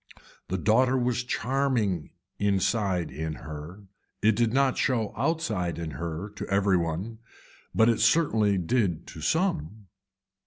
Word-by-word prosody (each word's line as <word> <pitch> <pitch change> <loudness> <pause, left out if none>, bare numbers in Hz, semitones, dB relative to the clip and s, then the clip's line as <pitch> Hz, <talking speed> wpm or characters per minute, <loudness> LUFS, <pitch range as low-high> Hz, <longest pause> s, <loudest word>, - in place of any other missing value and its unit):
The 95 - -2
daughter 125 +8 +3
was 125 -1 0
charming 125 - 0 0.3
inside 100 - +1
in 80 +3 -4
her, 80 +7 -9 0.4
it 110 0 +4
did 115 0 +2
not 135 +1 +2
show 115 -5 0
outside 115 - -1
in 85 -2 -4
her 85 +5 -5
to 105 - -5
every 100 -1 +2
one, 90 +7 -3 0.6
it 115 +1 +4
certainly 110 -11 +3
did 90 -3 0
to 80 - -9
some. 110 - -1
105 Hz, 125 wpm, -27 LUFS, 85-120 Hz, 0.6 s, it